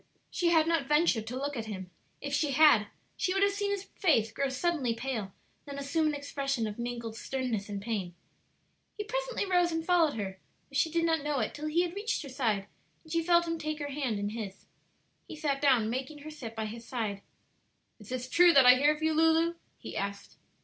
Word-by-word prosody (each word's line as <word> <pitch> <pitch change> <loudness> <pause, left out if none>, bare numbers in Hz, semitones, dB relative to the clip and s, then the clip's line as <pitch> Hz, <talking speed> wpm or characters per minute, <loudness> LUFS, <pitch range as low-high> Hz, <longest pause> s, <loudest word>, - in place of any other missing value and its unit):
She 350 - 0
had 325 -2 +4
not 330 -5 +1
ventured 295 -7 +2
to 250 +3 -4
look 285 +2 -3
at 225 -3 -4
him; 190 -4 -6 0.3
if 285 0 -4
she 290 -1 +1
had 270 -8 +6 0.3
she 370 0 -1
would 390 - +3
have 400 - +4
seen 405 0 -2
his 400 -1 -2
face 265 - +1
grow 275 +4 -1
suddenly 265 -3 0
pale, 230 -5 -3 0.3
then 280 -1 -7
assume 295 +3 0
an 300 - 0
expression 275 -4 -2
of 210 +1 -5
mingled 235 -2 -4
sternness 235 -4 -3
and 200 -1 -3
pain. 195 -5 -3 0.8
He 420 - -2
presently - - -2
rose 355 -2 +2
and 325 0 -2
followed 335 -4 +3
her, 190 -3 -5 0.3
though - - -11
she 320 - +3
did 335 +1 +1
not 325 -2 +2
know 295 -1 -1
it 220 - -1
till 300 +1 -5
he 335 +3 +2
had 350 -1 -3
reached 410 -2 -2
her 280 - -8
side 225 -7 0 0.4
and 320 - -15
she 335 0 +2
felt 345 0 +3
him 330 0 -2
take 310 0 -3
her 290 -1 -4
hand 265 -6 -1
in 205 0 -2
his. 210 -3 -7 0.6
He - - -8
sat 285 -3 -1
down, 255 -6 +4
making 260 +6 -4
her 310 - -7
sit 235 -7 -8
by 220 -1 -2
his 230 +2 -7
side. 220 -5 -3 0.8
"Is 210 - -14
this 255 0 -3
true 345 +6 +6
that 275 -4 +7
I 250 0 +9
hear 295 +3 +4
of 305 - -8
you, 315 0 +2
Lulu?" 325 +1 +3 0.2
he - - -9
asked. 200 0 -5
280 Hz, 220 wpm, -30 LUFS, 230-325 Hz, 0.8 s, I